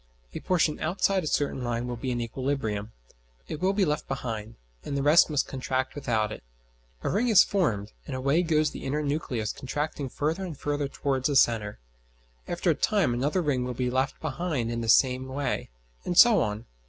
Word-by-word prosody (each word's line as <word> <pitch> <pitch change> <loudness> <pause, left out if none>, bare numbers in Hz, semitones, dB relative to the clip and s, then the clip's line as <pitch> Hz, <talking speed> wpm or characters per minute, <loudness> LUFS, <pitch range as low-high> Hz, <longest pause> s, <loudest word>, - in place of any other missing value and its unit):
A - - -4
portion 165 -4 +1
outside 190 +3 +1
a - - -3
certain 145 -3 0
line 120 0 -2
will 125 0 -4
be 125 +3 -4
in 120 -1 -1
equilibrium; 115 -4 -3 0.6
it 155 - -6
will 190 +1 +3
be 200 -1 +2
left 150 0 -2
behind, 115 -4 -4 0.3
and 140 - -3
the 140 - -1
rest 150 +4 +6
must 145 -2 0
contract 130 0 -2
without 110 -6 -1
it. - - -7 0.6
A - - 0
ring 225 +6 +1
is 215 -5 +7
formed, 115 - -1
and - - -4
away 140 +6 +2
goes 155 -3 +1
the - - -8
inner 145 +3 -1
nucleus 135 -7 -2
contracting 145 +1 -4
further 160 +8 -2
and 170 -6 -6
further 145 -1 -2
towards 135 0 -1
a 145 - 0
centre. 110 -5 +3 0.7
After 175 0 +1
a - - +3
time 190 - +1
another 145 +9 0
ring 135 -5 0
will 125 0 -4
be 125 0 -1
left 130 +2 -1
behind 155 -6 -2
in 115 0 -2
the 115 - -3
same 130 +2 +4
way, 135 +2 -3 0.3
and 175 - -3
so 235 -1 +8
on. 105 +2 -2
140 Hz, 195 wpm, -27 LUFS, 120-155 Hz, 0.7 s, so